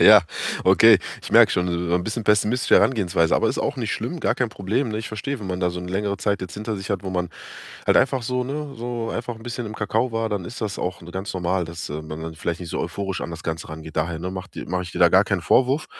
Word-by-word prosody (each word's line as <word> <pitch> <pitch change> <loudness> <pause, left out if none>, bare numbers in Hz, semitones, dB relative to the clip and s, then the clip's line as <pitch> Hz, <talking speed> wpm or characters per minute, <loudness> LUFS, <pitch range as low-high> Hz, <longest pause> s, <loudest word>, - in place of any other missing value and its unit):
Ja, 105 -1 +10 0.4
okay. 100 +2 +7 0.2
Ich - - -7
merke - - +8
schon, 90 0 +1
so 85 0 -1
so 85 - +2
'n 90 0 +1
bisschen 110 0 -3
pessimistische 105 +4 +4
Herangehensweise, 90 -9 +3
aber - - +3
ist - - -2
auch - - -1
nicht - - -2
schlimm, - - -3
gar - - +2
kein - - 0
Problem, 110 +7 -1
ne? 110 - -2
Ich 110 - -5
verstehe, 125 +4 -4
wenn 100 - -6
man 90 -1 -2
da 90 - +2
so 90 0 -5
'ne 90 - -6
längere 100 +1 -1
Zeit 100 0 0
jetzt 95 -2 -6
hinter 110 +1 -3
sich 95 +2 -6
hat, 100 -1 -1
wo 95 - -4
man 90 -1 -1 0.6
halt - - +5
einfach 130 -1 +3
so, 125 +2 -1
ne, 140 +1 -4
so 120 -1 -3
einfach 120 0 -3
'n 110 - -13
bisschen 120 -1 -4
im 110 - -6
Kakao 110 +3 0
war, 115 0 0
dann 100 -4 -2
ist 120 +8 -8
das 105 -3 -3
auch, 90 -1 -3
ne, 85 - -10
ganz 95 +2 -4
normal, 90 0 0
dass 85 0 -6
man 75 +1 -6
dann 80 0 -6
vielleicht 85 +2 -3
nicht 85 - -6
so - - -2
euphorisch 95 -2 -3
an - - -4
das 85 -1 -7
Ganze 80 0 -4
rangeht. 80 0 -9
Daher, 80 +1 0
ne, 90 +2 -4
mache 95 +1 -7
die - - -6
mache 90 0 -1
ich 90 - -8
dir - - -5
da - - +7
gar - - +5
keinen - - -1
Vorwurf. 135 +4 +3
95 Hz, 280 wpm, -23 LUFS, 90-115 Hz, 0.6 s, Ja